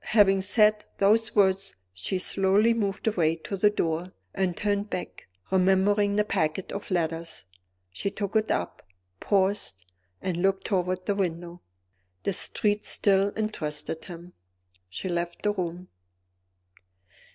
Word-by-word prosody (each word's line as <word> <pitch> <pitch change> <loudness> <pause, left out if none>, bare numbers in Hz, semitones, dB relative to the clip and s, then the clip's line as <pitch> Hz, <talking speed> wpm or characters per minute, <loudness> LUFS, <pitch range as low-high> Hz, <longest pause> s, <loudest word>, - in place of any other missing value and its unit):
Having 195 -3 +5
said 210 +2 +3
those 220 +3 +3
words 195 -1 +2 0.2
she 95 - -2
slowly 195 +4 +2
moved 200 -4 -2
away 170 -7 +2
to 165 +4 -6
the 205 +2 +4
door, 170 -2 -2 0.2
and 185 -3 -1
turned 205 0 -1
back, - - -6 0.2
remembering 195 +2 +3
the 210 - +3
packet 160 -3 -1
of 200 - -6
letters. 165 - -2 0.5
She 145 - -3
took 200 +1 -5
it 220 0 +2
up, 90 - -2 0.4
paused, 195 - +1 0.4
and 180 -3 -3
looked 195 +2 +1
toward 185 -1 -1
the 205 - +1
window. 175 -2 -3 0.6
The - - 0
streets 210 +3 0
still 200 0 +3
interested 160 -7 -3
him. 175 0 -10 0.6
She 95 - -5
left 175 -1 -3
the 210 - +3
room. 180 -1 -4
190 Hz, 130 wpm, -27 LUFS, 175-205 Hz, 0.6 s, Having